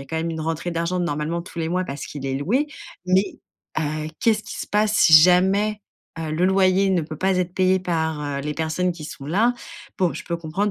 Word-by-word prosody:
a - - -11
quand 160 - -5
même 165 +1 -1
une 160 -1 -4
rentrée 165 +2 -2
d'argent 170 +2 -1
normalement 165 0 -2
tous 170 0 -10
les 165 0 -2
mois 185 +1 0
parce 140 -3 -6
qu'il 140 -2 -7
est 135 - -1
loué. 215 - 0 0.4
Mais, 185 +2 +1 0.4
heu, 155 0 -2
qu'est-ce 215 -2 +2
qui - - -8
se - - -4
passe 210 0 +1
si 160 -5 +6
jamais, 190 +5 +5 0.4
heu, 160 -1 -4
le 160 +4 0
loyer 190 0 +3
ne 185 -2 +2
peut 155 0 -7
pas 190 +3 +1
être 180 0 -2
payé 185 0 +3
par, 160 -4 -1
heu, 145 -1 -3
les 150 +2 -4
personnes 160 +3 -1
qui 165 -3 -10
sont 140 -2 -8
là? 215 +10 +2 0.5
Bon, 180 -3 +2
je - - -7
peux 170 - -2
comprendre 170 +6 -2
170 Hz, 230 wpm, -23 LUFS, 155-190 Hz, 0.5 s, si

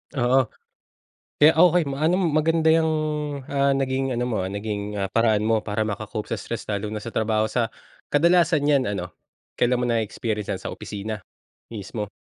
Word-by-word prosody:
Oo. 125 0 +3 1.0
Kaya 150 +2 +9
okey 175 0 +5
ma 135 - -4
ano, 170 +3 +3 0.2
maganda 160 +1 +2
yang, 160 -1 +2 0.6
ah, 140 0 +2
naging 135 -1 -1
ano 120 0 -1
mo, 115 - -1
ah, - - -3
naging, 105 0 -3 0.2
ah, 95 - -1
paraan 110 -2 +3
mo 115 - +4
para 105 0 -1
maka-cope 105 +1 -5
sa 115 - -1
stress, 115 +3 -6
lalo 105 0 -2
na 105 - -4
sa 115 - -6
trabaho 110 -1 +1
sa 115 -1 -1 0.4
kadalasan 165 -1 +4
yan 140 -3 +4
ano, 95 -4 -3 0.5
kailan 125 0 +2
mo 125 - +1
na-experience 110 -2 -2
yan - - -6
sa - - -5
opisina? 105 +1 -5 0.6
Mismo? 105 0 -5
115 Hz, 170 wpm, -24 LUFS, 105-140 Hz, 1.0 s, Kaya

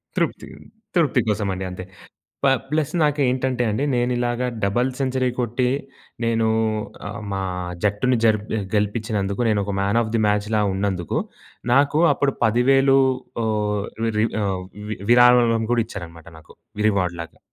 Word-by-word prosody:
తృప్తి. - - -1 0.5
తృప్తి 160 -6 +3
కోసమండి 100 -3 -1
అంతే. 90 0 -7 0.6
ప - - +5 0.2
ప్లస్ 155 -2 0
నాకేంటంటే 130 -4 +1
అండి, 110 +7 -1
నేను 120 0 +1
ఇలాగ 120 0 -1 0.2
డబుల్ 120 +6 +1
సెంచరీ 130 -1 0
కొట్టి 125 +1 0 0.6
నేను 115 -1 +1 0.6
ఆహ్, 100 - -6
మా 95 - -2 0.4
జట్టును 105 +5 +2
జరిపె 110 0 +1 0.2
గెలిపిచ్చినందుకు 105 -1 -1
నేను 105 -2 +2
ఒక 100 0 -3
మ్యాన్ 100 +4 +1
ఆఫ్ 110 0 -5
ది 115 - +2
మ్యాచ్‌లా 105 +1 +1
ఉన్నందుకు, 95 -3 -1 0.5
నాకు 140 +4 +3
అప్పుడు 140 0 0
10,000 135 +4 +4 0.5
ఓహ్, 105 -2 -1 0.3
రి 110 - +3 0.2
ఆహ్, 95 -2 -1 0.3
వి 110 - -3
విరాళం 120 -2 +5
కూడా 120 -1 +3
ఇచ్చారనమాట 85 -5 -9
నాకు. 80 - -17 0.3
రివార్డ్ 90 -4 0
లాగా. 85 - -13
110 Hz, 135 wpm, -22 LUFS, 100-125 Hz, 0.6 s, ప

